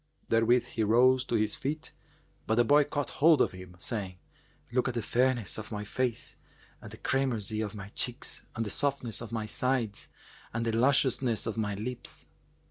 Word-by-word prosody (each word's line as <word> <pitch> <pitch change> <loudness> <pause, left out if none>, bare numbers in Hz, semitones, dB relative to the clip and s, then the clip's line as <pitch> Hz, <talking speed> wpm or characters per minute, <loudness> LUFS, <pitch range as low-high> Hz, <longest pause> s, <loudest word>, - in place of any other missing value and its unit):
Therewith 115 +2 +4
he 110 - -1
rose 125 +4 +5
to 120 - -1
his 110 -1 +1
feet; 150 +3 -4 0.6
but 110 - +2
the 120 - +5
boy 145 +4 +5
caught 145 0 -3
hold 160 +1 +5
of - - +3
him, 90 -1 -11
saying, 95 -1 -4 0.5
"Look 125 +1 +1
at 125 - -2
the 115 - 0
fairness 120 -3 +1
of 110 - -8
my 105 -1 -3
face 125 +2 -2 0.4
and - - -9
the - - -10
cramoisy 115 -6 0
of 110 -1 -4
my 100 -1 -7
cheeks 125 +4 -2
and 115 -1 -1
the 105 - -2
softness 135 -6 -1
of 115 -2 -7
my 110 -2 -2
sides 115 -8 -1 0.5
and 115 0 0
the 115 -1 0
lusciousness 130 -2 +2
of 115 - -2
my 105 -2 -1
lips." 120 +5 -5
115 Hz, 185 wpm, -30 LUFS, 110-130 Hz, 0.6 s, rose